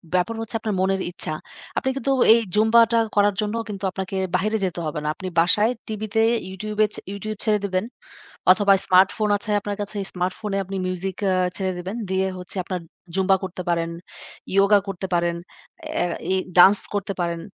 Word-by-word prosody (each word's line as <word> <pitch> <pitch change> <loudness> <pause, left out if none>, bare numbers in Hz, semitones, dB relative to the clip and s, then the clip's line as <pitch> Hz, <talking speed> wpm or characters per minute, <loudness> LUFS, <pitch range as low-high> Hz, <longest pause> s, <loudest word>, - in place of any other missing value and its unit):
ব্যাপার 220 +6 +1
হচ্ছে 225 0 -6
আপনার 215 -3 -2
মনের 190 0 +1
ইচ্ছা। 155 -3 -4 0.4
আপনি 265 - +1
কিন্তু 275 0 -1 0.2
এই 230 - +5 0.2
জুম্বাটা 230 +2 +5 0.2
করার 205 -1 +4
জন্য 210 +1 -2
কিন্তু 200 -1 -6
আপনাকে 190 +1 -5 0.2
বাহিরে 215 +4 +1
যেতে 180 -2 -3
হবে 155 0 -3
না। - - -3
আপনি 190 - -6
বাসায় 205 +7 +4 0.2
টিভিতে 215 +1 -1 0.3
YouTube 210 +3 -6
এ, - - -1
ছে - - -4
YouTube 215 +1 -5
ছেড়ে 210 -1 +3
দিবেন 185 -1 0 0.7
অথবা 200 +1 +5
Smartphone 190 +3 +4
আছে 210 +1 -5
আপনার 205 0 -3
কাছে 205 +1 -5 0.2
Smartphone 185 +3 -3
এ - - +1
আপনি 195 +2 -6
মিউজিক 185 +1 -3
অ্যা 185 - +2 0.2
ছেড়ে 190 -1 -1
দিবেন। 185 +4 -5
দিয়ে 190 0 +1
হচ্ছে 180 +2 -9
আপনার 180 0 -4 0.3
জুম্বা 190 0 +4
করতে 185 -1 -5
পারেন, 170 -1 0 0.7
yoga 200 +1 +6
করতে 190 -1 -4
পারেন, 170 0 +1 0.6
অ্যা 175 -1 0 0.2
এই - - +2 0.2
dance 195 +3 +8
করতে 200 0 -2
পারেন, 170 -1 -1
195 Hz, 180 wpm, -23 LUFS, 185-210 Hz, 0.7 s, dance